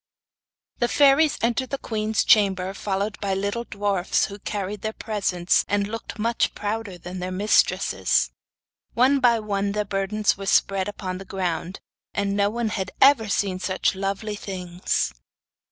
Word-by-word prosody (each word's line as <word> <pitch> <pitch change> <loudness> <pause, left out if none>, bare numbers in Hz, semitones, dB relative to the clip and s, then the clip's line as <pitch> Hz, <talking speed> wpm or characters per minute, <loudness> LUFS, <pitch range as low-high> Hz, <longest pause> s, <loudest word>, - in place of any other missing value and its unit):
The 240 - +2
fairies 280 +6 +4
entered 240 +2 0
the 275 - -2
queen's 220 -3 -1
chamber 195 -3 +3
followed 200 +1 -3
by 195 -2 -1
little 200 +5 -2
dwarfs 200 -4 0
who 200 +1 -9
carried 200 0 -4
their 220 +1 -3
presents 195 -6 0
and 200 0 0
looked 225 +2 -6
much 230 +2 0
prouder 210 -2 -4
than 180 +2 -7
their 180 0 -3
mistresses. 200 +4 +2 0.6
One 265 +4 +4
by 240 -3 +4
one 200 -1 -1
their 210 0 -1
burdens 200 +2 0
were 195 - -6
spread 195 0 +2
upon 185 -3 -5
the - - -7
ground, 180 -1 -3 0.3
and 200 0 0
no 200 0 +2
one 230 +1 -2
had 195 -3 -3
ever 265 -6 +5
seen 195 -2 0
such 185 +1 0
lovely 195 +2 -3
things. 180 - -2
200 Hz, 155 wpm, -24 LUFS, 190-220 Hz, 0.6 s, ever